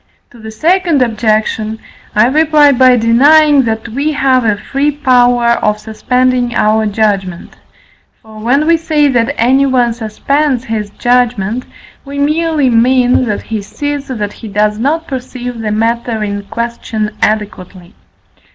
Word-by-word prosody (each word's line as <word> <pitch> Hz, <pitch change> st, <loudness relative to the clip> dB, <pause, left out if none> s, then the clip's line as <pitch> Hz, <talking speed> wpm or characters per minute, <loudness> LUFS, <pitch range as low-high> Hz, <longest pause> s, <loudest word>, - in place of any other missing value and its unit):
To 240 Hz, -, -16 dB
the 220 Hz, 0 st, -9 dB
second 325 Hz, +4 st, +1 dB
objection 220 Hz, -1 st, -1 dB, 0.4 s
I 215 Hz, +2 st, +4 dB
reply 300 Hz, +2 st, +3 dB
by 255 Hz, -1 st, +4 dB
denying, 285 Hz, +6 st, +4 dB
that 220 Hz, 0 st, -3 dB
we 280 Hz, +7 st, -2 dB
have 265 Hz, -3 st, +1 dB
a 215 Hz, -2 st, +1 dB
free 275 Hz, +7 st, -1 dB
power 245 Hz, -4 st, +2 dB
of 210 Hz, 0 st, 0 dB
suspending 250 Hz, +2 st, -1 dB
our 215 Hz, +1 st, +1 dB
judgment: 200 Hz, -4 st, -2 dB, 0.6 s
for, 220 Hz, -1 st, -14 dB
when 260 Hz, +7 st, +1 dB
we 335 Hz, +1 st, +3 dB
say 310 Hz, -2 st, +1 dB
that 245 Hz, +2 st, 0 dB
anyone 255 Hz, -1 st, +2 dB
suspends 250 Hz, +4 st, -1 dB
his 220 Hz, -4 st, -4 dB
judgment, 245 Hz, -1 st, -1 dB, 0.4 s
we 280 Hz, 0 st, -8 dB
merely 305 Hz, -1 st, +1 dB
mean 250 Hz, +2 st, +2 dB
that 210 Hz, -3 st, -3 dB
he 220 Hz, -2 st, -4 dB
sees, 290 Hz, +7 st, -5 dB
that 210 Hz, -6 st, -4 dB
he 225 Hz, -, -10 dB
does 210 Hz, +1 st, -1 dB
not 310 Hz, +7 st, -1 dB
perceive 250 Hz, -3 st, -6 dB
the 215 Hz, -1 st, -3 dB
matter 230 Hz, +1 st, -1 dB
in 205 Hz, -1 st, -4 dB
question 230 Hz, -1 st, -4 dB
adequately. 195 Hz, -4 st, -3 dB
240 Hz, 140 wpm, -12 LUFS, 215-275 Hz, 0.6 s, I